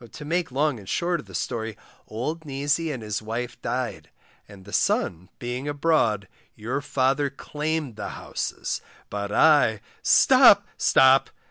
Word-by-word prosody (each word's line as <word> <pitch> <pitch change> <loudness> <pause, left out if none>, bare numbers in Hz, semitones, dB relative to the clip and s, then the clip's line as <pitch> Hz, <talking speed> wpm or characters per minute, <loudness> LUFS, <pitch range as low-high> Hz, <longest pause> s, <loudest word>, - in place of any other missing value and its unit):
To 150 - -9
make 170 0 -1
long 140 -1 0
and 95 - -12
short 175 0 0
of - - -11
the 95 - -10
story, 110 +4 -3 0.3
old 155 +9 -4
Neasy 145 +3 -1
and 125 -6 -6
his 105 +1 -3
wife 115 +3 -5
died, - - -3 0.4
and 95 -2 -14
the 105 - -12
son 90 +1 0
being 125 +3 -5
abroad, 145 - +1 0.3
your 125 +6 -3
father 140 0 +1
claimed 150 -3 -4
the - - -5
houses, - - -4 0.3
but 100 0 -4
I 140 -6 +4 0.2
Stop! - - +6
stop! 130 0 +4
130 Hz, 145 wpm, -25 LUFS, 110-150 Hz, 0.4 s, Stop